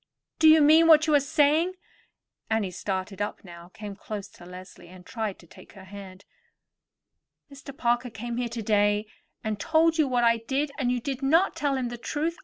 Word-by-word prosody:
Do 320 - +5
you 315 0 +7
mean 320 +3 +6
what 315 -1 +6
you 310 - +1
are 290 - +6
saying?" 300 +5 +2 0.8
Annie 220 -4 -1
started 190 +1 -5
up 205 - -4
now, 170 -2 -13
came 205 -1 -9
close 205 0 -7
to 175 - -16
Leslie, 180 -1 -12
and 180 0 -15
tried 220 -2 -4
to - - -18
take - - -17
her 195 -3 -13
hand. 190 -1 -12 1.3
"Mr. 275 0 -12
Parker 240 -2 0
came 235 +2 -6
here 245 -1 -2
today, 210 -2 0 0.4
and 215 -2 -3
told 325 +5 +2
you 305 - +3
what 245 -2 0
I 230 0 +4
did 270 +6 -2
yesterday, - - -16
and 250 -3 0
you 250 -1 -2
did 270 +1 -4
not 325 +8 +2
tell 285 -2 -1
him 250 -2 -2
the 240 0 -8
truth? 315 +7 -3
235 Hz, 200 wpm, -26 LUFS, 200-290 Hz, 1.3 s, you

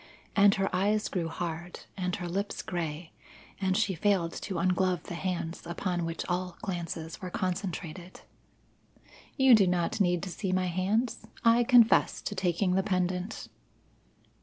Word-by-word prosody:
And 200 0 +6
her 195 0 0
eyes 210 +3 +1
grew 175 -4 -2
hard, 170 +1 -5
and 180 -2 -2
her 175 - -5
lips 200 +4 -3
grey, 165 -2 -4 0.5
and 190 -1 +1
she 210 -3 +1
failed 180 -2 +1
to 190 - -5
unglove 185 -2 +1
the - - -7
hands 170 -1 -3
upon 175 0 -2
which 165 0 -4
all 180 0 -2
glances 170 -2 -4
were 185 - -4
concentrated. 180 -1 -4 1.2
"You 265 -1 +7
do 205 -4 +6
not 180 +3 0
need 180 -2 +2
to 190 - -4
see 190 +2 -3
my 185 0 +1
hands; 200 +7 -1 0.2
I 230 +1 +6
confess 240 -2 +5
to - - -3
taking 185 -1 +1
the 190 - +3
pendant." 185 +1 -2
185 Hz, 150 wpm, -29 LUFS, 175-200 Hz, 1.2 s, You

